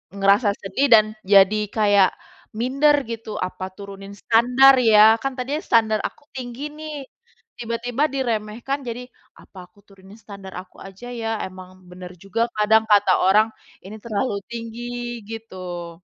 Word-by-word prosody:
ngerasa 200 +2 +3
sedih 200 +9 0
dan 215 -1 +7 0.2
jadi 200 +1 +5 0.2
kayak 205 -3 +4 0.5
minder 275 +4 +3
gitu. 225 -2 -6
Apa 185 0 -4
turunin 200 0 -10
standar 250 +4 +5
ya? 220 -2 +6
Kan 270 -1 -2
tadinya 275 +4 -3
standar 220 -2 +2
aku - - -19
tinggi 245 0 -7
nih, 310 0 -8 0.6
tiba-tiba 240 +3 -3
diremehkan 240 +1 -3
jadi, 240 +2 -5 0.4
apa 195 - -18
aku 205 - -26
turunin 195 +2 -17
standar 200 -3 -11
aku 185 - -21
aja 195 +5 -11
ya? 225 - -3 0.2
Emang 185 0 -12 0.2
bener 180 0 -10
juga 195 +4 -3 0.2
kadang 220 +1 +4
kata 205 -2 +5
orang 210 +3 +5 0.4
ini 215 +3 -9
terlalu 215 0 -2 0.2
tinggi 235 +1 -6 0.4
gitu. 180 -6 -8
220 Hz, 135 wpm, -22 LUFS, 195-240 Hz, 0.6 s, dan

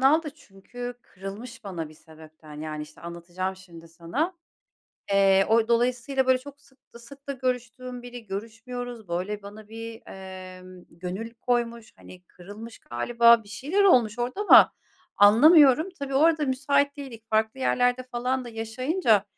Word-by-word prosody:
aldı. 300 +4 +3
Çünkü 245 -1 -9
kırılmış 215 +5 -9
bana 170 -5 -5
bir 155 - -15
sebepten, 155 -1 -14
yani, 155 -1 -5
işte, 150 0 -13
anlatacağım 175 +2 -5
şimdi 170 -3 -14
sana. 180 - -3 0.8
Eee, 195 -1 +5
o 225 0 +3
dolayısıyla, 250 +3 +1
böyle, 260 0 +4
çok 285 +2 -13
sık 265 -2 -28
da 235 - -10
sık 275 +4 -15
da - - -1
görüştüğüm 250 -1 -4
biri 245 -2 -10
görüşmüyoruz, 225 +2 -7
böyle, 190 +4 -3
bana 210 +1 -11
bir, 225 +1 -8
emm, 185 -1 -11
gönül 185 +7 -6
koymuş. 235 -1 -2
Hani, 180 0 -14
kırılmış 205 +6 -11
galiba, 235 - +3
bir - - -17
şeyler 290 - 0
olmuş 245 - +4
orada 245 +10 -3
ama 415 - +7 0.4
anlamıyorum. 285 - +7
Tabii, 275 -1 -4
orada 310 +2 +4
müsait 280 +2 +1
değildik. 255 -6 -9
Farklı 220 +4 0
yerlerde 245 0 +2
falan 255 +1 -2
da - - -8
yaşayınca, 225 - 0
230 Hz, 145 wpm, -26 LUFS, 190-255 Hz, 0.8 s, ama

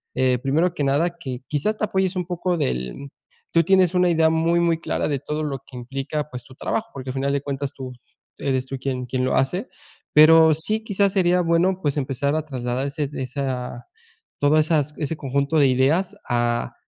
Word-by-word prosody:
eh, 130 -1 +2
primero 160 +7 +1
que 145 - -2
nada, 155 +6 +1
que 130 -5 -6
quizás 210 +9 -1
te 215 - 0
apoyes 190 -1 0
un 180 -1 -2
poco 180 0 -1
del 135 - -3 0.4
tú 165 - +5
tienes 185 0 +4
una 180 0 +4
idea 160 -1 +4
muy, 165 +1 +2
muy 170 -1 +2
clara - - -2
de 140 -2 -1
todo 150 +3 -3
lo 140 -2 -2
que 135 - -13
implica, 135 +4 -4
pues 125 -2 -8
tu 130 - -15
trabajo, 225 - -2
porque 130 -1 -7
al - - -9
final 140 +1 0
de 140 - 0
cuentas 140 0 -4
tú, 130 -2 -7 0.5
eres 130 -2 -1
tú 135 - -5
quien 130 -1 -3
quien 130 +1 -1
lo 130 - +1
hace. 180 - 0 0.5
Pero 160 +1 +7
sí 215 +8 -1
quizás 200 -2 +2
sería 180 -2 +3
bueno, 175 +2 +2
pues, 145 -1 -1
empezar 140 +1 -1
a 155 -1 -2
trasladar 130 -1 -3
ese 140 0 -3
esa 130 -2 -4 0.5
todo 145 +1 +3
esas 150 -2 +2
ese 155 +1 -3
conjunto 140 +2 0
de 140 - +5
ideas 150 +10 +2
a 120 0 0
145 Hz, 200 wpm, -23 LUFS, 130-170 Hz, 0.5 s, Pero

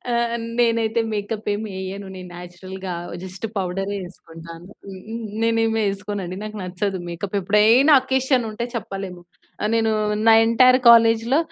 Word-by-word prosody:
ఆ! - - 0 0.5
నేనైతే 230 -1 +1
మేకప్ 210 +1 -4
ఏమి 210 0 -4
వేయను 190 +1 -6
నేను 180 -1 -9
నేచురల్‌గా 185 +1 -8 0.3
జస్ట్ 190 +4 -6
పౌడరే 195 +2 -2
వేసుకుంటాను. 165 0 -12 0.7
నేను 230 0 +2
ఏమి 225 0 0
వేసుకోనండి 195 -2 -3
నాకు 215 0 -7
నచ్చదు 185 +1 -3
మేకప్ 185 +4 -5
ఎప్పుడైనా 220 - +5
అకేషన్ 265 -1 +1
ఉంటే 225 +2 -4
చెప్పలేము, 195 -4 -6 0.5
నేను 225 -1 +2 0.4
నా 225 - +8
ఎంటైర్ 255 +2 +5
కాలేజ్‌లో 230 +3 +5
205 Hz, 125 wpm, -21 LUFS, 185-230 Hz, 0.7 s, నా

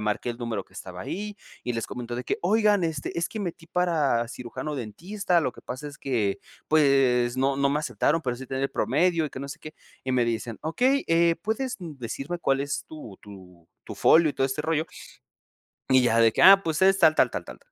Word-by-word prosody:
marqué 105 +3 -2
el 115 - -6
número 115 -5 -3
que - - -26
estaba 90 -1 -8
ahí, 210 - -5 0.3
y 125 - -1
les 115 -2 -3
comentó 120 -1 -6
de 125 - -5
que: - - -2
"Oigan, 210 0 +3
este, 160 0 -3
es 170 - 0
que 220 - -6
metí 170 -4 -6
para 155 -10 +1
cirujano 125 +6 -6
dentista, 175 - -1
lo 130 - -1
que - - -15
pasa 130 +4 -6
es 145 - -11
que, 110 -7 -1 0.3
pues, 135 -5 +3
no 135 +1 +1
no 140 0 +2
me 150 - +1
aceptaron, 150 +3 0
pero 125 -3 -2
sí 130 - -9
tenía 130 +1 -2
el 135 - -2
promedio, 160 +8 +1
y 145 - -9
que 130 - -8
no 140 - -6
sé - - -8
qué", 155 - -9 0.3
y 130 - -1
me 125 -2 +3
dicen: 115 -1 -3
"Okey, 255 - +1
eh, 165 0 +3
¿puedes 250 +4 -2
decirme 145 +1 -6
cuál 135 -4 +1
es 140 0 -3
tu 115 -11 -10
tu 90 -4 -14 0.2
tu - - -8
folio 160 -1 +5
y - - -10
todo 135 - +1
este 135 +3 -3
rollo" 160 0 0 1.1
y 130 -1 +6
ya 115 -2 +2
de 115 -1 +5
que - - +1
ah, 195 +1 +9
pues, 160 +1 -1
es 195 +1 +5
tal 155 - +5
tal - - +4
tal - - -5
tal - - -11
140 Hz, 225 wpm, -26 LUFS, 120-170 Hz, 1.1 s, ah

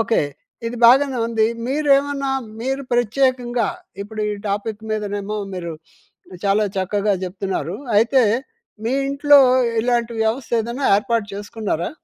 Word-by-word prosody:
Okay, 225 0 +2 0.5
ఇది 235 +1 -4
బాగానే 265 +1 +5
ఉంది. 225 -1 +2 0.2
మీరేమన్నా 280 0 +1 0.3
మీరు 270 +3 -2
ప్రత్యేకంగా 245 -1 +1 0.3
ఇప్పుడు 215 +1 -7
ఈ - - -1 0.2
టాపిక్ 205 +2 -3
మీదనేమో 210 -1 -3 0.2
మీరు 170 -2 -5 0.7
చాలా 200 +2 +3
చక్కగా 200 +2 0
చెప్తున్నారు. 185 -2 -3 0.2
అయితే 240 +4 +4 0.6
మీ 240 - 0 0.2
ఇంట్లో 285 +1 +6 0.4
ఇలాంటి 240 -1 0
వ్యవస్థ 225 +2 -2
ఏదైనా 240 +5 -3
ఏర్పాటు 230 0 0
చేసుకున్నారా? 205 -4 -3
230 Hz, 115 wpm, -20 LUFS, 205-260 Hz, 0.7 s, ఇంట్లో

